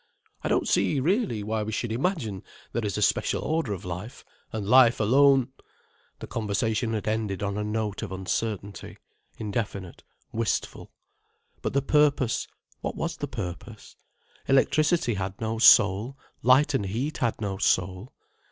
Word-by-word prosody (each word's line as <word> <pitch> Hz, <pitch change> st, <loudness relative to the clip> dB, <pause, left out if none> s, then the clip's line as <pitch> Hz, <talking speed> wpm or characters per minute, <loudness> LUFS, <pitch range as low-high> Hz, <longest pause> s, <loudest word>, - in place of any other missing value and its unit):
I -, -, -3 dB
don't -, -, +1 dB
see, 145 Hz, -, +2 dB
really, 165 Hz, -, 0 dB
why 110 Hz, +1 st, -2 dB
we 105 Hz, +1 st, -3 dB
should 110 Hz, +1 st, -2 dB
imagine 115 Hz, -, -2 dB, 0.3 s
there 115 Hz, -, -1 dB
is 100 Hz, -3 st, -2 dB
a -, -, +1 dB
special -, -, +1 dB
order 160 Hz, -7 st, -1 dB
of 95 Hz, -3 st, -5 dB
life, 90 Hz, +7 st, -7 dB, 0.3 s
and 110 Hz, -2 st, -4 dB
life 125 Hz, 0 st, +6 dB
alone——" 135 Hz, +3 st, +4 dB, 0.7 s
The -, -, -8 dB
conversation 110 Hz, +1 st, -1 dB
had 110 Hz, -1 st, -3 dB
ended 110 Hz, -2 st, -1 dB
on 100 Hz, -1 st, -2 dB
a 105 Hz, -, -2 dB
note 105 Hz, -1 st, -2 dB
of 110 Hz, -4 st, -5 dB
uncertainty, 100 Hz, +1 st, -4 dB, 0.4 s
indefinite, 100 Hz, -4 st, -4 dB, 0.3 s
wistful. 115 Hz, 0 st, -2 dB, 0.7 s
But -, -, -3 dB
the 140 Hz, 0 st, +1 dB
purpose, 145 Hz, -4 st, +2 dB, 0.3 s
what -, -, -4 dB
was -, -, -3 dB
the -, -, -4 dB
purpose? 90 Hz, -1 st, -7 dB, 0.5 s
Electricity 150 Hz, +1 st, +3 dB
had 95 Hz, -1 st, -4 dB
no 110 Hz, 0 st, -2 dB
soul, 110 Hz, +3 st, +5 dB, 0.2 s
light 135 Hz, +4 st, +4 dB
and 105 Hz, -7 st, 0 dB
heat 125 Hz, +10 st, -3 dB
had 120 Hz, -3 st, 0 dB
no 100 Hz, -3 st, -3 dB
soul. 95 Hz, +4 st, 0 dB
110 Hz, 150 wpm, -26 LUFS, 100-130 Hz, 0.7 s, life